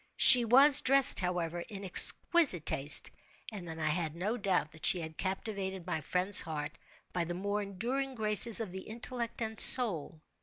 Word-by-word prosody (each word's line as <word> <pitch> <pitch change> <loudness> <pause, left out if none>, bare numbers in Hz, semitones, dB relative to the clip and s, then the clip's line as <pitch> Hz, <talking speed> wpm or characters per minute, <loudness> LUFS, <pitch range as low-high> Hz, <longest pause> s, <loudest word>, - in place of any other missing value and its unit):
She 245 -2 +8
was 275 +5 +4
dressed, 275 0 +3
however, 175 -2 -5
in 200 +2 -11
exquisite 190 - +1
taste—and 175 - -4
then 160 0 -10
I 155 - -5
had 160 -1 -5
no 200 +7 -5
doubt 190 -8 -4
that 155 0 -18
she 180 - +2
had 160 -1 -10
captivated 190 -1 -7
my 175 -3 -6
friend's 185 +6 +2
heart 150 -1 -8 0.4
by 175 - -4
the 175 +1 -8
more 200 +3 -5
enduring 245 +7 -7
graces 215 0 +5
of 220 -5 -8
the 190 +1 -10
intellect 235 +2 -8
and 220 0 -8
soul. 175 - +3
190 Hz, 165 wpm, -28 LUFS, 170-230 Hz, 0.4 s, She